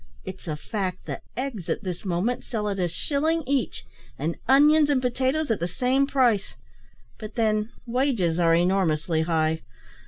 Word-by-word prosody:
It's 190 -1 -8
a 155 - -2
fact 185 +3 -4
that - - -5 0.2
eggs 250 -9 -4
at - - -1
this 180 0 -5
moment 190 +7 -1
sell 215 -4 -3
at 200 -1 -2
a 180 - +2
shilling 315 - 0
each, 270 -1 -1 0.3
and 165 +2 -2
onions 295 +3 +6
and 280 -3 +3
potatoes 260 +3 0
at 220 - 0
the 170 - -1
same 260 +8 +1
price; 245 -8 +2 0.6
but 215 0 -8
then 215 -2 +1 0.2
wages 235 - +1
are 165 -1 +4
enormously 170 -3 +1
high. 160 -1 +1
215 Hz, 160 wpm, -25 LUFS, 175-265 Hz, 0.6 s, onions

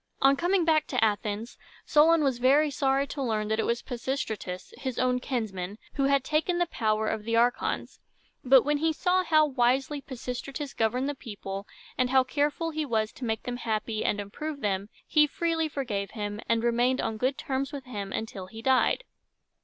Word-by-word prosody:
On 275 +1 +5
coming 350 +3 +2
back 310 -2 +3
to 255 - +1
Athens, 210 +1 -1 0.3
Solon 315 +1 +5
was 265 -4 +1
very 285 +4 +4
sorry 270 0 +1
to 280 0 -6
learn 215 -4 -1
that 220 0 0
it - - +1
was 235 0 0
Pisistratus, 225 -7 -4
his 260 -3 -4
own 250 0 +2
kinsman, 210 -7 -3 0.2
who 275 - +1
had 275 -1 +3
taken 315 +5 +1
the 350 - +2
power 220 -7 0
of 220 -1 -2
the 230 +1 -1
archons; 240 +1 0 0.4
but 260 -1 +6
when 295 +1 +1
he 320 +2 +1
saw 370 +3 +2
how 310 -3 +4
wisely 270 +1 +1
Pisistratus 265 +2 -6
governed 245 +4 0
the 290 - -1
people, 200 -6 -7 0.3
and 255 -1 +3
how 260 0 +5
careful 295 +5 -1
he 310 0 -2
was 220 -5 0
to 255 - -7
make 220 -1 -2
them 245 0 -4
happy 220 -2 -2
and 205 - 0
improve 280 +9 -5
them, 200 0 -1 0.2
he 300 -1 +4
freely 325 +1 -1
forgave 220 -9 -3
him, 205 -2 -4
and 230 0 +2
remained 240 +2 +2
on 225 -1 -2
good 260 +4 0
terms 270 0 -2
with 280 -3 -7
him 205 -6 -5
until 195 -4 -5
he 225 +4 -10
died. 265 - +3
255 Hz, 190 wpm, -28 LUFS, 220-285 Hz, 0.4 s, but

